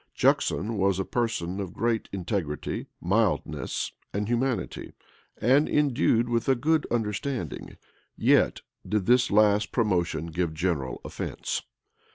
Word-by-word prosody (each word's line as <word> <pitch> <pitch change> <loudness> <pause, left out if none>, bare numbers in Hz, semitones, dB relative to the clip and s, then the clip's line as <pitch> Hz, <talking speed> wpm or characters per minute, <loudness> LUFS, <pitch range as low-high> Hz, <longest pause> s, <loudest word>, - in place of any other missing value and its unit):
Juxon 110 +3 +2
was 95 -1 +2
a 95 - -1
person 105 -6 -1
of 95 -3 -5
great 115 0 0
integrity, 90 -5 -3
mildness, 105 +3 0 0.2
and 105 +1 -2
humanity, 120 +2 -1 0.5
and 135 +6 +4
endued 130 -5 +2
with 120 +1 0
a 135 - +5
good 155 +5 +1
understanding.[] 115 - -3 0.4
Yet - - +3 0.2
did 105 -3 -1
this 125 +1 +4
last 105 0 +4
promotion 85 - 0
give 85 -1 -1
general 80 -6 -1
offence. - - -4
105 Hz, 120 wpm, -27 LUFS, 90-120 Hz, 0.5 s, a